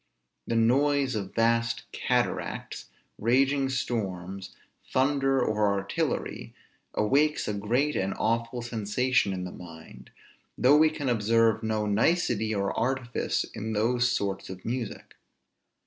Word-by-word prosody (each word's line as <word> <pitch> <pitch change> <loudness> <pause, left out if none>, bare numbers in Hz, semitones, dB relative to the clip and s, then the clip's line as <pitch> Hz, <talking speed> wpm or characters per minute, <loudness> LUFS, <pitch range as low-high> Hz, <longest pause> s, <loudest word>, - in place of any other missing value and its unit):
The 115 - -1
noise 135 +4 +3
of 100 -3 -4
vast 115 0 +1
cataracts, - - -2 0.3
raging 135 +4 +2
storms, 95 -7 -3 0.4
thunder, 135 0 +2
or 105 -3 +1
artillery, 100 0 -3 0.4
awakes 145 +8 +2
a 105 - -1
great 120 +9 0
and 95 +1 -1
awful 115 +1 -1
sensation 120 0 0
in 95 -1 -3
the 90 - -6
mind, 80 -2 -12 0.5
though 135 +4 +5
we 155 +1 +5
can 145 -3 -5
observe 115 -1 +2
no 110 -1 -1
nicety 110 0 +1
or 100 -2 -1
artifice 125 +1 -1
in 110 +1 -4
those 120 +3 +2
sorts 95 -1 -2
of 95 -1 -9
music. 120 -1 -4
115 Hz, 120 wpm, -27 LUFS, 105-130 Hz, 0.5 s, though